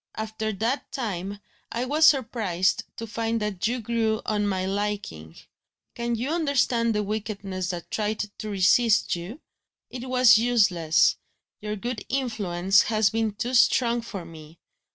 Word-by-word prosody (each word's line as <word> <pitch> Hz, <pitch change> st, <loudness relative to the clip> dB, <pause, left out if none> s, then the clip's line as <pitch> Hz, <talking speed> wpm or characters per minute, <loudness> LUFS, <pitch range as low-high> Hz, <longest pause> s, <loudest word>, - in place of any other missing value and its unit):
After 220 Hz, 0 st, -3 dB
that 225 Hz, +7 st, -2 dB
time, 200 Hz, -5 st, -4 dB, 0.3 s
I 240 Hz, +2 st, -2 dB
was 305 Hz, +4 st, +4 dB
surprised 220 Hz, -, +1 dB
to 230 Hz, -, -5 dB
find 230 Hz, +1 st, -2 dB
that 210 Hz, -2 st, -2 dB
you 245 Hz, +2 st, -1 dB
grew 225 Hz, -1 st, -1 dB
on 210 Hz, -1 st, 0 dB
my 190 Hz, -2 st, -1 dB
liking, 195 Hz, -, -4 dB, 0.6 s
Can 235 Hz, 0 st, -2 dB
you 250 Hz, +6 st, -3 dB
understand 255 Hz, -8 st, +1 dB
the 210 Hz, -, 0 dB
wickedness 200 Hz, -3 st, -4 dB
that 175 Hz, -2 st, -6 dB
tried 215 Hz, 0 st, -1 dB, 0.2 s
to 215 Hz, -, -5 dB
resist 205 Hz, +3 st, +3 dB
you? 185 Hz, -, -8 dB, 0.5 s
It 255 Hz, 0 st, -7 dB
was 250 Hz, -4 st, +6 dB
useless; 200 Hz, -9 st, +3 dB, 0.4 s
your 210 Hz, 0 st, -3 dB
good 230 Hz, +1 st, -5 dB
influence 195 Hz, -8 st, +1 dB
has 215 Hz, -2 st, +2 dB
been 225 Hz, -1 st, -1 dB
too 240 Hz, +5 st, -4 dB
strong 240 Hz, -1 st, +3 dB
for 200 Hz, -6 st, -7 dB
me. 160 Hz, -1 st, -13 dB
215 Hz, 145 wpm, -25 LUFS, 195-235 Hz, 0.6 s, was